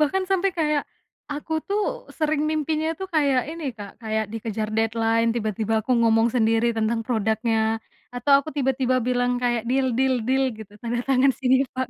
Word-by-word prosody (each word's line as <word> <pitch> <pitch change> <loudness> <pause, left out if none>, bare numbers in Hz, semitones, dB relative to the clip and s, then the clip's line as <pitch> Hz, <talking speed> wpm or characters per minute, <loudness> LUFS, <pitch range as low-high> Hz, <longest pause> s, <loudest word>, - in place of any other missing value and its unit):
bahkan 305 +6 +2
sampai 385 +1 +2
kayak, 300 -2 +1 0.5
aku 300 +2 -6 0.2
tuh 410 +1 +1 0.4
sering 310 -1 +1
mimpinya 310 +1 0
tuh 380 - -4
kayak 280 -4 +3
ini 330 -1 -7
Kak 200 -2 -8
kayak 220 0 -1
dikejar 220 -1 -3
deadline 225 +1 +1
tiba-tiba 220 -1 -1
aku 255 - -7
ngomong 225 0 +4
sendiri 225 0 +3
tentang 225 +1 0
produknya, 220 -1 0 0.6
atau 245 +4 +1
aku 280 - -5
tiba-tiba 260 -1 +1
bilang 245 0 +1
kayak, 240 -2 +1
"Deal 265 0 +2
deal 265 -1 +3
deal." 265 +1 +3
Gitu, 210 -2 -11
"tanda 240 0 -1
tangan 270 0 +4
sini 260 0 +3
pak." 260 -1 -1
250 Hz, 165 wpm, -24 LUFS, 225-285 Hz, 0.6 s, ngomong